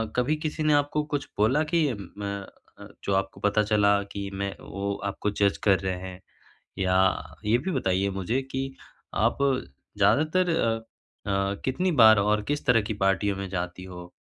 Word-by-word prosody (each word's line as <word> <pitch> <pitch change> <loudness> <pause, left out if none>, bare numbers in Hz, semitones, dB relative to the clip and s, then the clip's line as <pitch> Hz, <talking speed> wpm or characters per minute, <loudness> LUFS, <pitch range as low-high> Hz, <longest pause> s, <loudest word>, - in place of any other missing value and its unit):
कभी 125 +5 +2
किसी 155 0 -2
ने 155 0 +3
आपको 145 +1 +1
कुछ 145 - -3
बोला 125 +9 +3
कि 170 -1 +4
म 100 0 -6 0.3
अ, - - -10 0.2
जो 100 - 0
आपको 95 0 -2
पता 105 +1 +2
चला 100 -1 +3
कि 100 -1 -4
मैं 100 0 -3
वो 100 0 -4
आपको 100 +1 -2
जज 100 -1 +1
कर 100 -2 +4
रहे 95 -1 -2
हैं? 90 0 -10 0.6
या 95 -4 +1
ये 110 +3 +3
भी 155 +9 -3
बताइए 100 - 0
मुझे 95 +7 -1
कि 135 0 -3 0.4
आप - - +1 0.6
ज़्यादातर 165 +5 +3
अ 115 -9 +1 0.5
अ, 100 0 0
कितनी 180 +8 0
बार 110 -5 +7
और 105 +1 +2
किस 145 +4 -2
तरह 125 -4 +5
की 105 +1 -3
पार्टियों 95 +1 +2
में 100 -1 -4
जाती 90 0 -4
हो? 90 -1 -10
100 Hz, 175 wpm, -26 LUFS, 95-130 Hz, 0.6 s, बार